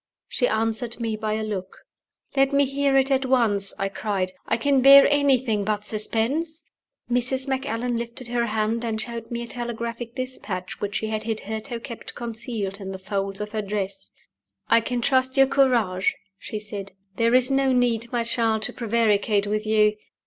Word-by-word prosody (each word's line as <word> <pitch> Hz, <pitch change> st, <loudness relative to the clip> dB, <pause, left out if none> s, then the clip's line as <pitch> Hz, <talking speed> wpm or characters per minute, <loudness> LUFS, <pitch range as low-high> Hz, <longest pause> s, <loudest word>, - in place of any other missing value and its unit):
She 245 Hz, -, +1 dB
answered 225 Hz, +2 st, -1 dB
me 225 Hz, -2 st, -2 dB
by 215 Hz, 0 st, -2 dB
a 220 Hz, 0 st, -2 dB
look. 190 Hz, -3 st, -5 dB, 0.6 s
"Let 270 Hz, 0 st, +3 dB
me 280 Hz, 0 st, +4 dB
he 280 Hz, +1 st, -1 dB
ar 270 Hz, -, +4 dB
it 270 Hz, +1 st, +2 dB
at 270 Hz, 0 st, +2 dB
once!" 215 Hz, -6 st, +3 dB
I 195 Hz, -, -1 dB
cried. 195 Hz, -2 st, -2 dB, 0.2 s
"I -, -, +1 dB
can 275 Hz, +2 st, +2 dB
bear 275 Hz, +1 st, +9 dB
anything 265 Hz, -7 st, +2 dB
but 210 Hz, 0 st, -2 dB
suspense." 270 Hz, +10 st, 0 dB, 0.4 s
Mrs. 255 Hz, +2 st, +1 dB
Macallan 245 Hz, -2 st, -1 dB
lifted 235 Hz, +1 st, -4 dB
her 235 Hz, -1 st, 0 dB
hand, 220 Hz, +2 st, -1 dB
and 225 Hz, -2 st, -2 dB
showed 230 Hz, 0 st, -5 dB
me 235 Hz, 0 st, -4 dB
a -, -, -8 dB
telegraphic 235 Hz, 0 st, -5 dB
dispatch 215 Hz, -8 st, -5 dB
which 205 Hz, 0 st, -3 dB
she 220 Hz, -, -1 dB
had 215 Hz, 0 st, -3 dB
hitherto 220 Hz, +2 st, -4 dB
kept 235 Hz, -1 st, -7 dB
concealed 225 Hz, -4 st, -4 dB
in 195 Hz, 0 st, -5 dB
the -, -, -5 dB
folds 195 Hz, 0 st, -3 dB
of 210 Hz, 0 st, -5 dB
her 215 Hz, -1 st, -2 dB
dress. 200 Hz, -1 st, -4 dB, 0.6 s
"I 230 Hz, -, +5 dB
can 245 Hz, +1 st, -2 dB
trust 260 Hz, +1 st, +2 dB
your 270 Hz, -, +7 dB
courage," 240 Hz, -9 st, +2 dB, 0.2 s
she 215 Hz, -, -6 dB
said. 200 Hz, -2 st, -7 dB, 0.2 s
"There 230 Hz, +1 st, +3 dB
is 255 Hz, +1 st, +4 dB
no 270 Hz, 0 st, +3 dB
need, 240 Hz, -2 st, +1 dB
my 240 Hz, -2 st, 0 dB
child, 225 Hz, -2 st, +1 dB
to -, -, +3 dB
prevaricate 215 Hz, -3 st, +1 dB
with 215 Hz, +1 st, -2 dB
you. 210 Hz, -1 st, +3 dB
230 Hz, 180 wpm, -24 LUFS, 210-255 Hz, 0.6 s, bear